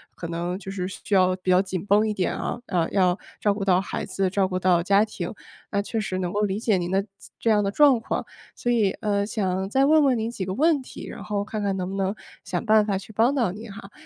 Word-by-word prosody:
可 170 - -6
能 170 +2 -3
就 195 0 -8
是 185 -2 -3
需 195 - -6
要 185 -1 +4
比 185 0 -1
较 180 0 +5
紧 190 -2 -4
绷 210 +2 +4
一 - - 0
点 185 -3 -1
啊， - - -3
呃， 170 -6 0
要 185 -2 +2 0.2
照 205 -1 +2
顾 200 - -4
到 185 -2 +4
孩 195 - -4
子、 195 -1 -1
照 195 -1 +2
顾 185 -1 -2
到 180 -2 +3
家 200 +4 +4
庭， 190 -4 -5 0.4
那 200 - +1
确 225 +2 -3
实 190 -3 -2
能 180 -1 -2
够 205 - 0
理 205 0 0
解 220 -4 +2
您 175 -1 -2
的 195 +1 +1
自 - - -15
这 230 - +2
样 210 -1 +3
的 200 - 0
状 275 +3 +5
况。 225 - -3 0.3
所 240 - -1
以， 220 -5 +3
呃， 200 -1 +1
想 190 -3 -1
再 265 +5 +3
问 310 +1 +5
问 260 -3 +3
您 225 +1 -2
几 200 - -4
个 185 - -3
问 305 +1 +3
题， - - -10
然 - - -8
后 205 -1 -2
看 215 0 -4
看 200 -1 -1
能 185 -1 -2
不 195 - -5
能 195 +1 -1 0.3
想 - - -3
办 215 -1 +5
法 200 -2 0
去 195 +3 -10
帮 235 +6 +3
到 235 -9 +1
您 215 +3 -9
哈。 200 -1 -11
200 Hz, 285 characters per minute, -24 LUFS, 185-220 Hz, 0.4 s, 较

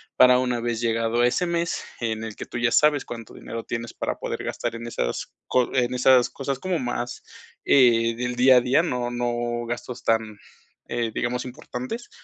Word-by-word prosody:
para 125 0 +7
una 125 -1 0
vez 120 -1 -2
llegado 115 0 +1
ese 125 +8 +2
mes 170 -1 -1 0.2
en 110 -2 -2
el 110 -2 -6
que - - -7
tú - - -6
ya 120 0 +2
sabes 150 0 +4
cuánto 115 -2 -8
dinero 115 0 -6
tienes 115 -1 -5
para - - -3
poder - - -4
gastar - - -3
en 115 +1 -6
esas - - -3 0.2
co 125 -1 +1
en 125 -1 +2
esas 125 0 +5
cosas 135 -1 -4
como 185 0 -1
más, 120 -1 -4 0.4
eh, 115 -4 +5
del 125 +1 -3
día 130 +1 +6
a - - +5
día. 130 +6 +3
No 125 -7 -1
no 120 -1 -2
gastos 120 +1 -5
tan, 110 -2 0 0.5
eh, 120 -1 -2
digamos 125 +2 -2
importantes, 130 - -6
120 Hz, 185 wpm, -24 LUFS, 115-125 Hz, 0.5 s, para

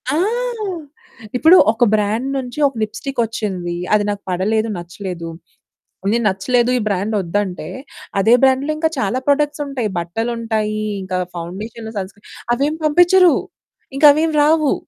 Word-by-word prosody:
ఆ! - - +1 1.2
ఇప్పుడు 325 +7 +7
ఒక 235 +2 0
బ్రాండ్ 215 +5 0
నుంచి 250 +2 -5
ఒక 270 - -7
లిప్స్టిక్ 255 +5 -5
ఓచ్చింది. 190 -6 -3 0.2
అది 210 -1 +4
నాకు 205 0 -5
పడలేదు, 215 +5 0
నచ్చలేదు. 175 -1 -6 0.8
నేను 235 0 +1
"నచ్చలేదు, 240 +6 +1
ఈ - - 0
బ్రాండ్ 200 +2 -1
ఓద్దంటే", 185 +1 -2 0.5
అదే 225 +4 +4
బ్రాండ్‌లో 265 +3 +3
ఇంకా 320 0 +1
చాలా 225 +6 0
ప్రొడక్ట్స్ 295 +1 +1
ఉంటాయి. 250 -6 -2
బట్టలుంటాయి, 220 +3 -2 0.2
ఇంక 185 0 -7 0.2
ఫౌండేషన్లు, 215 +6 -7
సన్ 190 -1 -3
స్క్రీన్ 205 - -22 0.3
అవేమీ 295 +5 -1
పంపించరు. 355 +3 +5 0.6
ఇంక 300 - +4
అవేమీ 315 0 0
రావు. 310 -1 +3
225 Hz, 135 wpm, -18 LUFS, 200-275 Hz, 1.2 s, ఇప్పుడు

